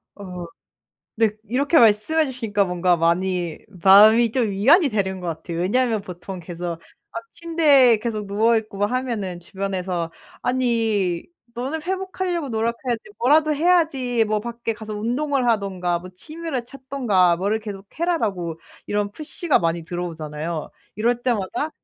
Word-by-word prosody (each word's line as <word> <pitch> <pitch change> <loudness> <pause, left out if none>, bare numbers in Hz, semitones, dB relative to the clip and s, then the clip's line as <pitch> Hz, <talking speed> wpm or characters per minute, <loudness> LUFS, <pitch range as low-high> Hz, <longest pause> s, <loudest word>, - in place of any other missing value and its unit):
어 180 -3 -7 0.7
네, 225 -1 +3
이렇게 270 +9 +1
말씀해 235 +7 +4
주시니까 225 -6 0
뭔가 180 -1 +1
많이 175 0 0 0.3
마음이 215 +4 +7
좀 235 -3 +1
위안이 275 - +5
되는 195 -5 -1
것 180 - -6
같아요. 165 +1 -5
왜냐하면 225 +4 +1
보통 185 0 -8
계속 170 0 -5 0.3
막 - - -6
침대에 295 -8 +4
계속 215 -1 -3
누워 215 +4 +2
있고 215 -2 -3
막 205 +1 +1
하면은 230 -9 -2
주변에서 185 -2 -3 0.3
"아니 225 -8 0 0.3
너는 270 +7 -3
회복하려고 370 -3 -2
노력해야지. 235 +1 -2 0.2
뭐라도 305 +5 +4
해야지. 295 -7 +2
뭐 215 0 0
밖에 235 +1 -4
가서 215 -1 -7
운동을 255 +5 -1
하든가 190 -5 0
뭐 180 +1 -10
취미를 310 - -5
찾든가 245 -10 +1
뭐를 200 +5 0
계속 205 -3 -8
해라.'라고 205 - -1 0.3
이런 205 0 -1
푸시가 310 +5 -1
많이 165 -1 -1
들어오잖아요. 160 -2 -5 0.3
이럴 235 +3 0
때마다 240 +4 -1
215 Hz, 325 characters per minute, -22 LUFS, 185-255 Hz, 0.7 s, 마음이